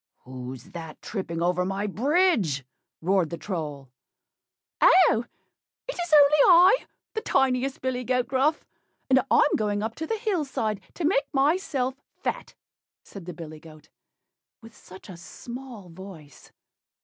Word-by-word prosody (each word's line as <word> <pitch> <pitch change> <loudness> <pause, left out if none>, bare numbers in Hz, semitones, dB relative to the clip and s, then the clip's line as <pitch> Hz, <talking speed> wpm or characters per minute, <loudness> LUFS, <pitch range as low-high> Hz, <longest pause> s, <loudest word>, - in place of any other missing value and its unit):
"Who's 130 -1 -9
that 165 -2 -9
tripping 170 -5 -4
over 180 +1 +1
my 195 +2 -2
bridge?" 225 - +1 0.4
roared 185 -1 +1
the 170 - -5
Troll. 150 -8 -6 0.9
"Oh! 275 -11 +5 0.6
it - - -3
is 350 -2 -5
only 295 0 +6
I, 360 +5 +7 0.4
the 440 - -2
tiniest 265 -3 0
billy 255 -1 -2
goat 250 0 0
Gruff; 275 +4 +1 0.5
and 260 0 +6
I'm - - +4
going 205 -1 -1
up 220 +1 -3
to 320 - -4
the 450 - -1
hill 410 -7 -1
side 220 -7 -3
to 345 - -3
make 300 -3 +1
myself 275 -2 +1 0.2
fat," - - -4 0.5
said 195 -4 -11
the 180 - -6
billy 155 -2 -9
goat, 155 -1 -16 0.7
with 225 0 -15
such 185 +1 -14
a 190 - -9
small 240 +2 -10
voice. 165 -5 -13
220 Hz, 140 wpm, -26 LUFS, 170-280 Hz, 0.9 s, I